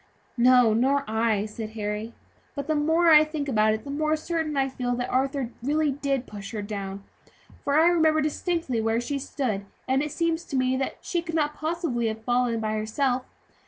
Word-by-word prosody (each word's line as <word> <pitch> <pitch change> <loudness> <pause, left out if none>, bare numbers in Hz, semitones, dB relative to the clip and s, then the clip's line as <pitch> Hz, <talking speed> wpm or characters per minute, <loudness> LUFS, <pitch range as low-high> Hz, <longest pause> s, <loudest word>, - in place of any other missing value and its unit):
"No, 250 -2 +6
nor 270 +5 +2
I," 220 -1 +1
said 215 0 -7
Harry; 210 +1 -4 0.4
"but 280 -2 -3
the 310 - 0
more 320 +3 +3
I 305 -1 +9
think 305 -2 -4
about 215 -4 +3
it 220 - -8
the 280 - -6
more 305 +2 +1
certain 315 -2 -2
I 270 0 +2
feel 250 -2 -2
that 245 0 -3
Arthur 270 +1 +1
did 240 -1 -7
really 295 +2 +1 0.3
push 205 -1 -9
her 210 -2 -3
down; 200 -1 -5 0.6
for 285 - 0
now 315 - +6
I - - +6
remember 320 -2 +3
distinctly 305 -5 -1
where 225 +1 +1
she 275 +4 -3
stood, 225 -8 -3 0.2
and 265 +1 +2
it 300 0 -3
seems 335 +1 0
to - - -5
me 260 +1 +1 0.2
she 345 - -1
could 330 -1 -5
not 300 -2 +1
possibly 310 -7 -2
have 220 0 -4
fallen 245 0 +1
of 225 - -3
herself. 220 +5 0
260 Hz, 195 wpm, -26 LUFS, 225-305 Hz, 0.6 s, I